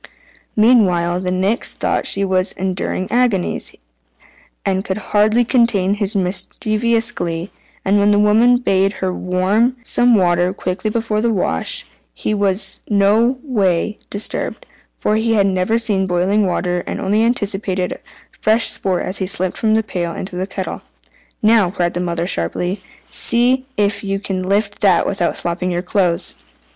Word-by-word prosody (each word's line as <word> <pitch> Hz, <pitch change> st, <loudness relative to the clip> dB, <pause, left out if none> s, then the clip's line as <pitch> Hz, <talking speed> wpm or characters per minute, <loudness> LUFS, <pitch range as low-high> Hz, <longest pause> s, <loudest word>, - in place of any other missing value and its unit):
Meanwhile 185 Hz, -7 st, +3 dB
the 185 Hz, -, -2 dB
Nix 190 Hz, +5 st, -1 dB
thought -, -, -1 dB
she 200 Hz, 0 st, +1 dB
was 185 Hz, 0 st, 0 dB
enduring 185 Hz, 0 st, -3 dB
agonies, 235 Hz, -7 st, 0 dB, 0.9 s
and 190 Hz, -1 st, 0 dB
could 190 Hz, -, -3 dB
hardly 215 Hz, +3 st, +2 dB
contain 225 Hz, -6 st, +2 dB
his 205 Hz, 0 st, -1 dB
mischievous 215 Hz, +5 st, 0 dB
glee; 170 Hz, -3 st, -4 dB, 0.3 s
and 200 Hz, +1 st, +3 dB
when 200 Hz, +1 st, +3 dB
the 205 Hz, -, +4 dB
woman 220 Hz, +4 st, +4 dB
bade 195 Hz, -4 st, +1 dB
her 185 Hz, -2 st, -3 dB
"warm 195 Hz, +8 st, +1 dB
some 240 Hz, +1 st, +3 dB
water 180 Hz, -1 st, +2 dB
quickly 185 Hz, +3 st, -3 dB
for 220 Hz, -1 st, -1 dB
the 235 Hz, 0 st, +1 dB
wash," 180 Hz, -, -1 dB, 0.3 s
he 215 Hz, -, -2 dB
was 195 Hz, -1 st, -1 dB
in 205 Hz, -, 0 dB
no 220 Hz, +6 st, +3 dB
way 210 Hz, -, 0 dB
disturbed, 210 Hz, -, -4 dB, 0.3 s
for 215 Hz, -, 0 dB
he 225 Hz, +1 st, +1 dB
had 200 Hz, -2 st, +3 dB
never 190 Hz, +3 st, +1 dB
seen 205 Hz, -5 st, 0 dB
boiling 190 Hz, +3 st, +1 dB
water, 180 Hz, 0 st, -1 dB
and -, -, -4 dB
only 210 Hz, +3 st, +1 dB
anticipated 195 Hz, -5 st, -1 dB, 0.3 s
fresh 225 Hz, +2 st, +2 dB
sport 185 Hz, -2 st, -1 dB
as 185 Hz, -, -3 dB
he 190 Hz, -, -1 dB
slipped 185 Hz, -1 st, -1 dB
from 220 Hz, -1 st, +2 dB
the 220 Hz, -, +2 dB
pail 175 Hz, -5 st, -3 dB
into 185 Hz, -1 st, -6 dB
the 185 Hz, +1 st, -3 dB
kettle. 190 Hz, -1 st, -5 dB, 0.6 s
"Now," 215 Hz, -4 st, +4 dB
cried 175 Hz, -2 st, -1 dB
the 175 Hz, -, -3 dB
mother 170 Hz, -1 st, -2 dB
sharply, 180 Hz, -, -2 dB, 0.3 s
"see 250 Hz, +2 st, +3 dB
if 200 Hz, 0 st, 0 dB
you 195 Hz, 0 st, -2 dB
can 190 Hz, -2 st, -3 dB
lift 200 Hz, +2 st, -1 dB
that 190 Hz, -4 st, +4 dB
without 185 Hz, -3 st, -1 dB
slopping 175 Hz, +1 st, -2 dB
your 175 Hz, 0 st, -2 dB
clothes." 180 Hz, -2 st, +1 dB
195 Hz, 155 wpm, -18 LUFS, 185-220 Hz, 0.9 s, the